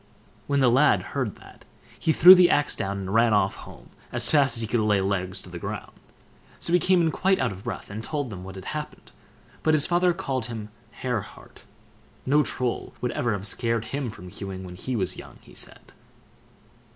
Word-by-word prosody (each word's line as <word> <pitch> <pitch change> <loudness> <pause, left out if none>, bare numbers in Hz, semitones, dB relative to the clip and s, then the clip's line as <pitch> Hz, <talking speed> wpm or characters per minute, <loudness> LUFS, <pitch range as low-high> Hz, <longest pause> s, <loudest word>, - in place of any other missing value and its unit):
When 140 -1 +1
the 125 -2 +5
lad 135 +5 +4
heard 130 -8 -2
that, - - -16 0.4
he 160 - +1
threw 180 +4 +10
the 180 -1 +6
axe 145 0 +2
down, 100 0 -3
and 95 0 -5
ran 115 0 +4
off 100 - +2
home - - -13 0.2
as 120 0 +3
fast 140 -5 +4
as - - +1
he 110 - -2
could 120 +2 0
lay 105 -2 +2
legs 95 -1 -2
to - - -13
the 85 - -7
ground; - - -6 0.7
so 170 - -2
he 180 - +6
came 180 0 +3
in 160 - +2
quite 190 +3 +2
out 130 -4 0
of 95 0 -10
breath, - - -6
and 110 +2 -6
told 145 -2 -3
them 90 -2 -8
what 95 0 -9
had 95 -1 -9
happened, 150 -1 -7 0.5
but 155 0 +3
his 150 - +5
father 175 +1 +3
called 135 -9 -3
him 110 -3 -7 0.2
"hare 120 0 -3
heart"—no 145 +8 -5
Troll 125 -4 -3
would 125 - -2
ever 120 -3 -1
have 100 -1 -4
scared 115 +2 0
him 140 -3 -2
from 90 -4 -10
hewing 95 0 -7
when 90 -1 -9
he 125 +8 -4
was 100 -5 -2
young, - - -11
he - - -18
said. - - -4
120 Hz, 210 wpm, -25 LUFS, 100-145 Hz, 0.7 s, threw